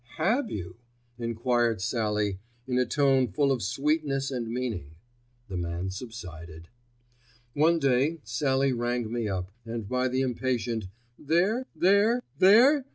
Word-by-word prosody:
"Have 220 - +1
you?" 90 - -6 0.4
enquired 115 -1 0
Sallie 105 -1 -1 0.3
in 125 -1 0
a 125 - +1
tone 135 -2 +3
full 140 +7 +1
of 130 -3 0
sweetness 135 - 0
and 120 -3 -3
meaning. 110 - -4 0.5
The 95 -3 -5
man 85 +2 -3
subsided. 85 -7 -9 0.8
One 160 +5 +3
day 140 +2 +2
Sallie 130 +4 +1
rang 120 -1 -2
me 120 -2 -1
up, 95 -1 -3
and 115 -2 -5
by 125 +3 0
the 130 +1 0
impatient 120 -4 -1 0.3
"There? 190 - +1
There?? 205 +6 +3 0.2
There??? 255 +9 +6
125 Hz, 130 wpm, -27 LUFS, 110-145 Hz, 0.8 s, There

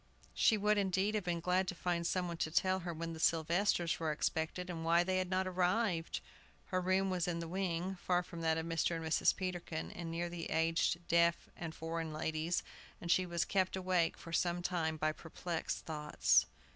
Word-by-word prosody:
She 220 - +4
would, 210 0 +3
indeed, 195 +1 +1
have 210 -2 0
been 170 -1 -1
glad 180 +2 +2
to 180 - -3
find 170 -1 -1
some 185 -1 0
one 170 -1 -4
to 160 - -1
tell 185 +3 +2
her 175 -1 -4
when 165 0 -4
the 160 - -8
Sylvesters 170 +2 +2
were 160 -2 0
expected, 160 +4 -1
and 165 -2 -5
why 170 +1 +4
they 185 +1 +1
had 185 -1 -2
not 185 0 +1
arrived. 180 -1 0 0.5
Her 185 -1 +1
room 190 +1 +2
was 180 -2 0
in 175 -1 -1
the 170 0 -4
wing, 185 +1 -2
far 180 0 +1
from 170 -1 -8
that 160 -1 +2
of 160 - -2
Mr. 165 0 0
and 165 -1 -4
Mrs. 160 - +3
Peterkin, 175 -4 -4
and 170 -1 -6
near 170 +1 -2
the 170 -1 -5
aged 165 +1 +1
deaf 170 0 +3
and 165 -2 -6
foreign 165 0 -3
ladies, 155 +2 -1 0.4
and 170 - -2
she 185 0 +3
was 170 -1 0
kept 190 -2 +1
awake 185 -3 +1
for 165 - -10
some 175 0 +1
time 160 -3 0
by 155 0 +1
perplexed 165 +1 -4
thoughts. 150 -2 +2
170 Hz, 205 wpm, -35 LUFS, 165-185 Hz, 0.5 s, She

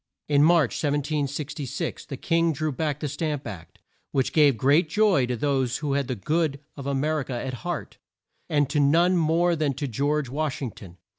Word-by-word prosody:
In 145 -1 +4
March 160 -5 +4
1766, 145 -1 -2
the - - -6
king 165 0 +1
drew 155 +2 -2
back 150 +1 -2
the 150 - -1
Stamp 145 0 -3
Act, 90 -8 -9 0.3
which 135 -2 0
gave 145 -6 +5
great 145 - +3
joy 195 - +3
to 125 - -1
those 130 -1 0
who 145 -2 -2
had 140 -2 0
the 130 - -2
good 150 - 0 0.2
of 140 -1 -7
A 140 - 0
mer 155 +3 0
i - - -2
ca 130 -1 -5
at 130 +2 -4
heart, 175 -4 -5 0.5
and 145 -2 +2
to 150 - +1
none 165 +6 +4
more 170 +1 +2
than 150 -4 0
to 145 +1 -3
George 140 +4 0
Wash 145 +2 -2
ing 130 -5 -3
ton. 90 -4 -13
145 Hz, 200 wpm, -25 LUFS, 135-155 Hz, 0.5 s, gave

